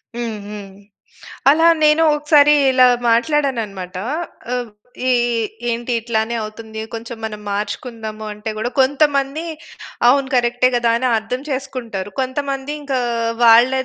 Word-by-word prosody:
హ్మ్, 235 -2 -3
హ్మ్. 205 -1 -8 0.8
అలా 325 +3 +4 0.2
నేను 305 +1 +5
ఒకసారి 295 0 +5 0.2
ఇలా 255 -1 +5 0.2
మాట్లాడానన్నమాట. 230 - 0 0.6
ఆహ్, 245 -2 -3 0.4
ఇ - - +4 0.2
ఇ 230 -1 0 0.3
ఏంటి 235 +1 -3
ఇట్లానే 225 0 -1
అవుతుంది. 220 +1 -8
కొంచెం 230 +1 -6
మనం 210 -1 -5
మార్చుకుందాము 220 +1 -5
అంటే 210 +1 -6
కూడా 235 +3 -2
కొంతమంది 280 +2 +1 0.6
"అవును 270 +1 +3
కరెక్టే 245 +1 +2
కదా!" 240 -1 +2
అని 255 +1 0
అర్థం 225 +4 -4
చేసుకుంటారు. 250 -7 -5
కొంతమంది 275 +1 -3
ఇంకా 275 -2 -1 0.5
వాళ్ళ 235 +2 +7
240 Hz, 120 wpm, -19 LUFS, 220-275 Hz, 0.8 s, వాళ్ళ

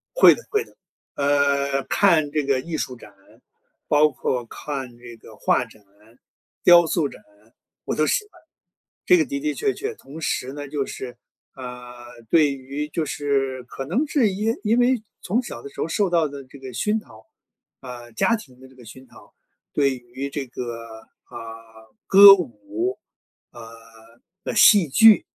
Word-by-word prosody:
会 - - +8
的 475 - -12
会 425 0 0
的。 - - -23 0.4
呃， 140 -1 +1
看 165 -7 +2
这 150 0 -1
个 135 -1 +1
艺 160 +4 -5
术 130 - -4
展， 105 - -15 0.8
包 150 +1 +4
括 125 -3 -3
看 130 -1 -7
这 120 -1 -12
个 115 - -16
画 - - +1
展， 110 - -19 0.8
雕 175 -1 +7
塑 160 -2 0
展、 - - -14 0.6
我 - - -2
都 155 - +1
喜 405 - 0
欢。 - - -21 0.7
这 360 - +6
个 325 - +2
的 280 0 -5
的 300 +1 -2
确 415 -3 -1
确， 435 +2 -5
同 150 +4 -12
时 130 -3 -2
呢， 145 0 -7
就 140 -1 -3
是， 125 -2 -8 0.4
呃， 125 -2 -11
对 150 -4 +4
于 140 +2 -6
就 155 +1 -2
是 135 -3 -2
可 135 +2 -7
能 235 - 0
是 270 -8 +2
因 210 +4 -1
因 225 +2 +1
为 245 -1 +2 0.2
从 225 +7 0
小 120 - -8
的 - - -8
时 - - -10
候 - - -1
受 200 +4 0
到 165 -3 +2
的 140 -1 -9
这 135 +2 -15
个 130 -1 -9
熏 210 - -1
陶， 110 - -18 0.5
啊， 120 -2 -10
家 230 - +1
庭 130 - -15
的 130 - -14
这 130 - -21
个 125 - -15
熏 130 +4 -13
陶， - - -19 0.4
对 140 -2 +1
于 125 +3 -7
这 140 -1 -5
个， 120 -2 -7 0.4
啊， - - -14 0.7
歌 200 +1 +10
舞， 115 - -4 0.5
啊， 120 - -12 0.8
呃， - - -3
戏 205 -6 +6
剧， 220 +9 +6
140 Hz, 185 characters per minute, -22 LUFS, 125-190 Hz, 0.8 s, 歌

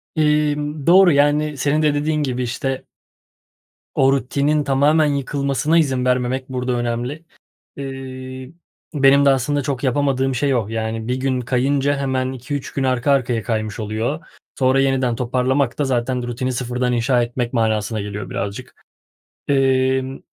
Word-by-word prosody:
Imm, 150 -1 0
doğru, 185 0 +7
yani, 145 +1 +2
senin 145 +3 +1
de 150 -1 +3
dediğin 150 +1 0
gibi, 125 -2 -2
işte 135 +2 -3 1.1
O 135 0 +4
rutinin 140 +3 0
tamamen 145 +3 +3
yıkılmasına 140 +2 0
izin 130 -6 +1
vermemek 125 +1 0
burada 125 0 -2
önemli. 120 +6 -3 0.5
Eee, 130 -1 -7 0.4
benim 140 0 +5
de 140 - +6
aslında 140 +2 +1
çok 135 -1 -3
yapamadığım 135 -1 +1
şey 135 +1 +1
o. 110 -4 0
Yani, 110 0 -3
1 125 - 0
gün 130 -1 -1
kayınca 135 +3 +1
hemen 130 -1 -1
2-3 130 +2 -5
gün 135 - -1
arka 130 +1 +1
arkaya 125 -4 +1
kaymış 110 -2 -3
oluyor. 110 +8 -2 0.4
Sonra 130 0 +3
yeniden 130 -3 +1
toparlamak 125 +2 0
da 145 - +2
zaten 125 -1 -1
rutini 125 +2 -2
sıfırdan 125 0 -1
inşa 120 +1 +2
etmek 120 +1 -3
manasına 110 -2 0
geliyor 105 0 -6
birazcık. 100 +1 -5 0.7
Emm, 130 -1 +1
130 Hz, 140 wpm, -20 LUFS, 125-140 Hz, 1.1 s, doğru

